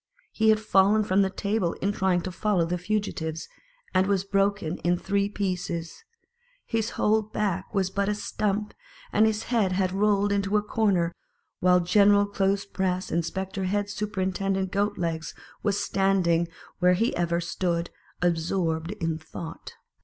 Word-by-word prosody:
He 220 0 +2
had 215 0 +5
fallen 210 0 +4
from 195 -1 +2
the 190 - +2
table 200 -2 -1
in 200 - -1
trying 190 -3 +1
to 185 - -5
follow 190 -2 +1
the 175 +1 -2
fugi 205 +3 -1
tives, 160 0 -4 0.5
and 185 +1 +3
was 195 -2 +1
broken 195 -3 0
in 175 +1 +1
three 200 +2 0
pieces; 180 -4 -3 0.6
his 225 0 -1
whole 220 +1 +3
back 200 -3 -2
was 190 -2 +1
but 200 +1 0
a 210 - 0
stump, 210 0 -2 0.4
and 220 - +5
his 220 0 -1
head 220 -6 +1
had 185 -1 +1
rolled 205 +1 +2
into 200 +1 +1
a 210 - 0
corner, 195 -6 +1 0.5
while 180 0 +4
General 205 +3 +5
clothes 200 0 0
press 185 -1 -2
inspector 190 +3 -2
head 205 +2 -1
superintendent 195 -2 -1
Goat 205 +1 0
legs 165 -2 -3 0.3
was 205 -1 0
standing 185 -4 +2 0.3
where 180 0 +5
he 225 +7 +2
had - - -4
ever 170 0 +1
stood, 170 0 -2 0.3
absorbed 165 0 0
in 165 -5 -2
thought. 160 +1 -9
195 Hz, 160 wpm, -26 LUFS, 175-205 Hz, 0.6 s, had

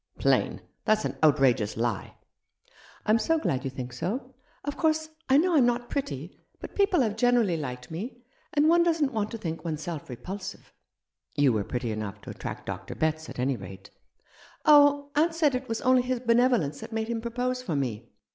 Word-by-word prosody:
" - - -36
Plain! - - +1 0.2
That's 215 0 +2
an - - -2
outrageous 135 -9 +3
lie." 115 -3 -2 0.5
" - - -26
I'm 215 +2 +4
so 325 +8 +2
glad 135 - -1
you 135 - -2
think 125 -1 -6
so. 200 - -4 0.3
Of 290 - -3
course, 315 -1 +1 0.2
I 265 - +6
know 345 +3 +3
I'm 260 -5 +5
not 240 0 -1
pretty; 165 - -4 0.2
but - - -8
people 395 -6 +3
have 215 -4 0
generally 235 -5 +3
liked 125 -4 -6
me, 235 +9 -6 0.3
and 295 +1 +3
one 340 +1 +5
doesn't 320 -5 +2
want 215 -1 -1
to 230 - -5
think 165 -6 -5
one's 155 -2 -3
self 165 -5 -5
repulsive." 190 +10 -7 0.6
"You 140 -4 +4
were 105 -2 0
pretty 120 +1 -3
enough 105 -1 -4
to - - -8
attract - - -7
Dr. - - -6
Betts, 160 0 -1
at - - -9
any 130 +2 +1
rate." 95 -1 -10 0.7
"Oh, 285 -1 +6
aunt 325 +3 +3
said 305 -4 +3
it 255 +1 -3
was 225 0 -2
only 255 0 +4
his 250 0 -1
benevolence 235 - +2
that - - -9
made 220 0 -2
him 230 -1 -2
propose 250 +2 -2
for 200 -11 -3
me. 120 -5 -3
220 Hz, 195 wpm, -27 LUFS, -, 0.7 s, I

